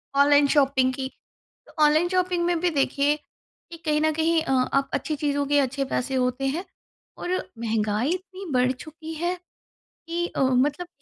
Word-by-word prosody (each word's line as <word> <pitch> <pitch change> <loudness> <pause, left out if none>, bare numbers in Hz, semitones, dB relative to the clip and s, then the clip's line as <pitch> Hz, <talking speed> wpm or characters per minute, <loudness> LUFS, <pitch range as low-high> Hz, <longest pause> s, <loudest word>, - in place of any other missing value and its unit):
online 285 0 +5
shopping 270 -3 +3
की, 265 0 -3 0.6
तो - - -17
online 310 +3 +4
shopping 365 -1 +1
में 345 -1 +1
भी 355 +1 +2
देखिए 285 0 +1 0.5
कि 335 - -8
कहीं 300 -1 +1
न 315 0 +2
कहीं 320 +1 +2
अ, 315 - -2
आप 265 +1 +1
अच्छी 310 - -2
चीज़ों 285 -1 -1
के 290 +1 +3
अच्छे 275 +1 -1
पैसे 265 0 -2
होते 250 +1 0
हैं 315 +7 -2 0.5
और 360 +1 -1 0.2
महँगाई 220 +2 0
इतनी 370 +1 -6
बढ़ 250 0 +3
चुकी 315 +4 -9
है 345 +3 -1 0.7
कि 340 +1 -1
अ, - - -4
मतलब 280 +6 +1
290 Hz, 170 wpm, -25 LUFS, 265-335 Hz, 0.7 s, online